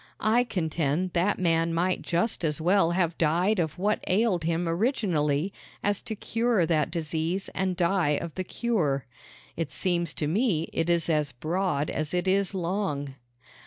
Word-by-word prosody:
I 235 +3 +3
contend 170 - -1
that 185 +4 +2
man 165 -2 +1
might 180 +2 +1
just 175 +3 -1
as 150 -1 0
well 175 +1 +3
have 175 -1 0
died 175 +6 +2
of 160 -2 -1
what 205 +4 0
ailed 185 -4 +2
him 170 +1 0
originally 170 - 0 0.3
as 205 -1 +1
to 225 -2 -5
cure 225 -3 +1
that 155 -2 +1
disease 165 +3 -2
and 185 -1 -1
die 170 -5 +2
of 170 -2 -6
the 185 - -3
cure. 175 - -1 0.5
It 160 -5 -3
seems 170 -1 -1
to 150 - -2
me 170 - +1
it 165 - 0
is 170 -1 +2
as 150 -4 +1
broad 155 +2 -1
as 155 +2 -2
it 180 +1 0
is 195 0 +2
long. 170 -6 -2
175 Hz, 165 wpm, -27 LUFS, 160-195 Hz, 0.5 s, I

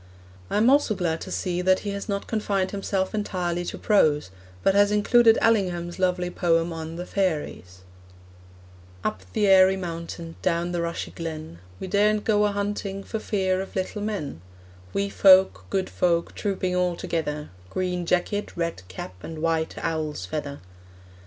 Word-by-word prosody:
I - - 0
am 220 +3 +4
also 270 -5 +4
glad 165 -3 -1
to 185 - -7
see 180 -1 -1
that 185 +1 +3
he 205 - -3
has 200 +2 -5
not 200 0 -2
confined 200 -4 -1
himself 195 -1 -1
entirely 180 -4 -2
to - - -5
prose, 150 - +2 0.3
but 195 - +4
has 205 +1 +4
included 225 +2 +5
Allingham's 180 -6 +1
lovely 180 -1 +1
poem 165 -1 +1
on 160 0 -6
The 175 +1 -5
Fairies: 150 - -2 1.2
Up 95 - -2
the 210 - +2
airy 190 -1 +6
mountain, 170 -2 -6
Down 175 0 0
the 175 -1 -1
rushy 170 0 -3
glen, 155 - -6 0.2
We - - -5
daren't 210 +2 +2
go 210 -1 +3
a 205 - +1
hunting 200 -1 -3
For 220 - -4
fear 190 -3 0
of 195 - -8
little 190 +2 -2
men; 200 - -4 0.5
Wee 200 0 0
folk, 190 -1 +5
good 190 -1 0
folk, 170 -1 0
Trooping 185 -3 -2
all 180 -1 +1
together; 150 -3 -3 0.2
Green 180 - -2
jacket, 180 +4 -1
red 170 - -2
cap, 90 0 -7
And 160 -1 -7
white 160 0 0
owl's 155 - -2
feather! 140 +8 -5
180 Hz, 160 wpm, -25 LUFS, 165-200 Hz, 1.2 s, airy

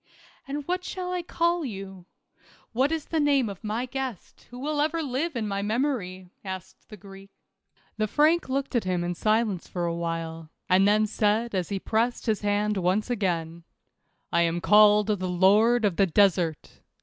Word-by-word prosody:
"And'what 295 +6 -3
shall 360 -1 -5
I 360 - -1
call 340 0 0
you? 195 -6 -8 0.6
What 260 +5 +1
is 320 -2 -2
the 325 - -1
name 280 -6 +2
of 195 0 -9
my 220 +4 -2
guest, 255 -5 -6
who 245 - -10
will 290 +3 -1
ever 320 +2 0
live 285 +4 -2
in 225 -3 -2
my 200 -1 -2
memory? 205 -6 -2
" - - -46
asked 190 -2 -8
the 210 - -10
Greek. 195 +1 -13 0.7
The 215 0 0
Frank 310 +6 +2
looked 275 0 -2
at 235 - +2
him 180 -2 -1
in 175 0 -2
silence 215 0 0
for 175 -1 -3
a 170 - -1
while, 165 -1 -4 0.2
and 190 +2 +4
then 215 +1 +3
said 215 +2 0
as 185 -3 -2
he 200 - -2
pressed 230 +5 -1
his 220 -3 0
hand 205 0 0
once 190 +6 0
again, 170 -6 -2 0.7
"I 170 - +4
am 170 0 +1
called 210 +2 +5
the 195 -3 -1
lord 210 +6 +4
of 195 -5 0
the 195 - +4
desert. 175 -3 +1
210 Hz, 180 wpm, -26 LUFS, 185-255 Hz, 0.7 s, called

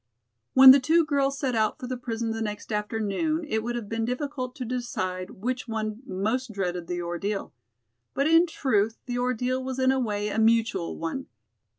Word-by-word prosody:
When 265 0 +11
the 275 - +7
two 320 +5 +3
girls 275 -2 +1
set 265 -3 -1
out 220 -2 +1
for 270 - -7
the 255 +1 -3
prison 230 -2 -3
the 225 0 -3
next 210 0 -5
afternoon 220 - -1
it 220 -4 0
would 240 +2 -3
have 235 -3 -4
been 225 +1 -2
difficult 255 +1 -3
to 255 - -5
decide 185 -7 -3
which 250 +5 -4
one 215 0 -3
most 225 +5 -1
dreaded 180 -4 -3
the 175 -1 -3
ordeal. 195 +4 -3 0.6
But 275 - +1
in 330 +3 +5
truth 225 -8 0
the 245 -1 -3
ordeal 255 +1 -1
was 260 0 -4
in 260 0 +3
a 265 - +1
way 210 -3 -1
a 210 - -1
mutual 225 -5 +2
one. 165 +12 -4
235 Hz, 190 wpm, -26 LUFS, 210-260 Hz, 0.6 s, When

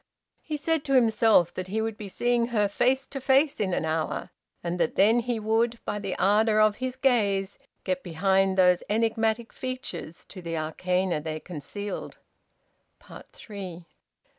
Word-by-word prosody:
He 305 -1 -4
said 320 +1 0
to 275 - 0
himself 220 -7 +4
that 185 0 -5
he 210 +4 -2
would 220 0 -2
be 210 -1 -8
seeing 240 +4 +1
her 215 -4 +1
face 255 +6 +1
to 270 - -7
face 270 +3 +3
in 200 -3 0
an 170 - -1
hour, 160 0 -2 0.3
and 175 +1 -3
that 160 - 0
then 220 +4 +5
he 235 -1 -2
would, 225 +2 +1
by 210 - -2
the 195 -2 -4
ardour 215 +2 +3
of 215 -1 +4
his 255 0 -3
gaze, 205 -7 +1 0.2
get 185 -1 -1
behind 190 +2 +1
those 180 -1 +5
enigmatic 225 +1 0
features 255 - -6
to 185 - -11
the 165 -1 -4
arcana 180 +2 -1
they 155 0 -4
concealed. 180 +6 -7 1.2
THREE. 185 -5 -9
210 Hz, 160 wpm, -26 LUFS, 180-235 Hz, 1.2 s, then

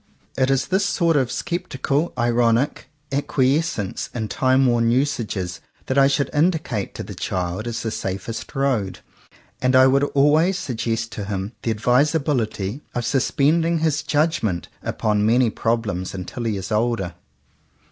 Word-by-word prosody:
It 130 0 +2
is 135 -1 +1
this 190 +2 +2
sort 170 -4 +2
of 130 -4 +1
sceptical, 150 -2 -2
ironic 120 +2 +1 0.2
acqui 140 0 +2
escence 160 - -3
in 110 -3 -3
timeworn 130 -3 +3
usages 110 - -1 0.2
that 130 +1 +1
I 135 - +6
should 140 0 0
indicate 150 - 0
to - - -5
the - - -8
child 90 +4 -3
as 115 -1 -3
the 115 - -2
safest 100 +8 -5
road. 130 -9 0 0.6
And 130 0 +2
I 130 0 +8
would 135 +1 +4
always 155 +6 +4
suggest 115 -5 -2
to 105 - -5
him 100 0 -3
the 115 - -1
advis 125 +8 +3
ability 125 -6 -1
of 120 -1 -1
suspending 155 +6 +2
his 155 -2 +1
judgment 145 - 0
upon 105 -2 0
many 115 +2 +3
problems 110 -6 -2
until 95 +6 -5
he 110 -3 0
is 95 +2 -6
older. 110 -5 0
125 Hz, 145 wpm, -22 LUFS, 110-145 Hz, 0.6 s, I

